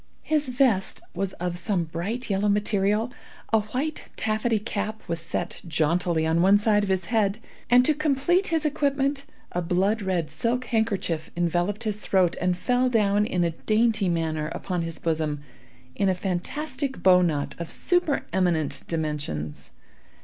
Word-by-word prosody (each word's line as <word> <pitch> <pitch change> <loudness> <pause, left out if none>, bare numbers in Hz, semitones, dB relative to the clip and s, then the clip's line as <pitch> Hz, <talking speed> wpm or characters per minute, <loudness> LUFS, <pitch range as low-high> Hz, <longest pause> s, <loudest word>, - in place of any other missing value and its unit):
His 300 -3 +1
vest 245 -7 +1
was 195 -1 -2
of 175 0 -4
some 185 -1 0
bright 185 +10 -3
yellow 205 0 +1
material; 210 +2 +1 0.4
a 220 - +6
white 255 +9 -4
taffety 220 +1 +1
cap 210 0 -3
was 165 - -2
set 170 +1 -4
jauntily 165 +1 +1
on 165 +1 +2
one 195 +3 +6
side 210 0 +3
of 205 - -2
his 190 -2 0
head; 210 -2 +2 0.3
and, 250 +1 +6
to 310 - +4
complete 305 +6 +1
his 325 -2 +1
equipment, 280 -1 0 0.3
a 175 - -1
blood 190 +5 +1
red 180 -5 -1
silk 240 +9 -1
handkerchief 200 -9 -1
enveloped 175 +5 0
his 210 -2 -1
throat, 185 -4 +2
and 180 0 +1
fell 250 +6 +1
down, 210 -3 +2
in 180 -4 0
a 170 - +1
dainty 215 +2 +1
manner, 160 -2 -1
upon 180 -3 -2
his 165 -1 -2
bosom, 155 -3 -2 0.5
in 195 +5 +2
a 185 - +2
fantastic 265 - -2
bow 180 -1 +7
knot 150 -5 0
of 170 - -5
super 355 -5 0
eminent 175 -5 +1
dimensions. 145 - -3
200 Hz, 155 wpm, -25 LUFS, 170-235 Hz, 0.5 s, bow